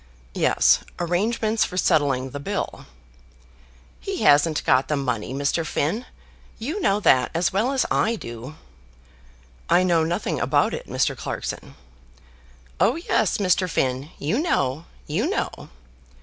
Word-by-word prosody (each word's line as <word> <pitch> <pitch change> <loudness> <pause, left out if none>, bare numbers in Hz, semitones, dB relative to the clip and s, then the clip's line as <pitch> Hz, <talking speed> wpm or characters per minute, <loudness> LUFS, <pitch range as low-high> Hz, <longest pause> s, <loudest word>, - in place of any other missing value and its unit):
"Yes, - - +3 0.2
arrangements 215 +6 0
for 180 - -4
settling 140 -7 +1
the 145 - -6
bill." 140 - -4 1.1
"He - - -4
hasn't 145 +2 +4
got 130 - +3
the 150 - 0
money, 125 -6 -2
Mr. 145 +4 0
Finn. 165 - -2 0.5
You 305 - -4
know 200 - +2
that 130 -9 +4
as 175 +2 +1
well 220 +7 +1
as 270 -2 +1
I 230 +2 +2
do." 120 - -8 1.1
"I 180 +1 +5
know 170 -3 +3
nothing 170 +2 -2
about - - +2
it, - - -6
Mr. - - 0
Clarkson." - - -6 1.0
"Oh 240 - +3
yes, 335 - 0
Mr. 185 -2 +1
Finn; 130 -1 -1
you 160 - -1
know; 150 - 0 0.2
you - - -1
know." - - -3
165 Hz, 135 wpm, -23 LUFS, 140-210 Hz, 1.1 s, I